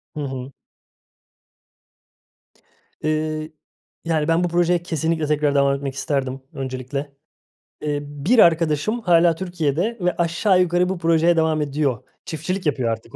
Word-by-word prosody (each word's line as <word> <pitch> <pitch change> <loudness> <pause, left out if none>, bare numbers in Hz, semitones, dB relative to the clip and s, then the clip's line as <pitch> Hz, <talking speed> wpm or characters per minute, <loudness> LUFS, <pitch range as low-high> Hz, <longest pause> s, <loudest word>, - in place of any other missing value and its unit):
Hı - - -5
hı. 130 0 -5 2.5
Iıı, 155 0 -1 0.5
yani, 160 -2 0
ben 165 +2 +2
bu - - +2
projeye 175 0 +1
kesinlikle 160 -1 -1
tekrar 150 -1 +1
devam 140 0 +3
etmek 135 -1 -5
isterdim, 135 -2 -2
öncelikle. 135 +2 -5 0.7
Eee, 145 -1 -1
bir 145 - +1
arkadaşım 165 +7 +3
hâlâ 170 -3 +4
Türkiye'de 175 +4 -1
ve 180 0 +1
aşağı 180 +3 +2
yukarı 180 +1 +2
bu 190 - -2
projeye 165 0 +3
devam 160 -1 +2
ediyor. 140 -5 -1 0.2
Çiftçilik 175 +4 -4
yapıyor 130 -5 0
artık 115 +1 -5
155 Hz, 130 wpm, -22 LUFS, 140-170 Hz, 2.5 s, hâlâ